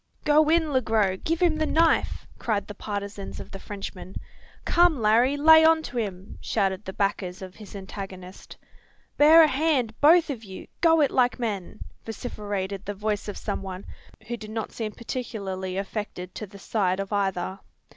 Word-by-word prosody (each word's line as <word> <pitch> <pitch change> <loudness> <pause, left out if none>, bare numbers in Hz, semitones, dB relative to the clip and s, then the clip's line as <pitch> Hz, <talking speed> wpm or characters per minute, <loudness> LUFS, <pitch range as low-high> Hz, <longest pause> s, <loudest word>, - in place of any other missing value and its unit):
"Go 300 +1 +5
in, 320 -2 +3
Le 260 - +3
Gros! 210 -5 +1
give 330 +2 0
him 330 -3 +3
the 310 0 0
knife!" 330 +1 +2
cried 205 -4 -1
the 205 - -8
partisans 200 -1 -6
of - - -9
the 195 - -8
Frenchman. 195 -2 -8 0.5
"Come, 345 -5 +4
Larry! 235 +6 +3
lay 320 +2 +7
on 320 0 +5
to 250 - -6
him!" 195 -3 -6
shouted 195 -2 -1
the 190 - -6
backers 190 -2 -2
of 185 -1 -9
his 210 0 -12
antagonist. 190 -1 -9 0.6
"Bear 315 +3 +8
a - - +6
hand, 275 -5 +1
both 325 +1 +6
of 235 -5 -6
you! 190 -3 -9 0.2
go 325 -2 +5
it 285 - +3
like 250 -1 +2
men!" 215 -5 -4 0.2
vociferated 205 -3 -5
the 205 +1 -5
voice 210 +1 -2
of 205 - -5
some - - -3
one, 190 0 -7 0.4
who 240 +2 -4
did 215 -2 -9
not 220 0 -4
seem 220 -2 -4
particularly 195 -6 -5
affected 195 -2 -5
to 215 - -6
the 200 +1 -13
side 190 -2 0
of 195 +1 -4
either. 190 -1 -1
210 Hz, 175 wpm, -26 LUFS, 195-275 Hz, 0.6 s, Bear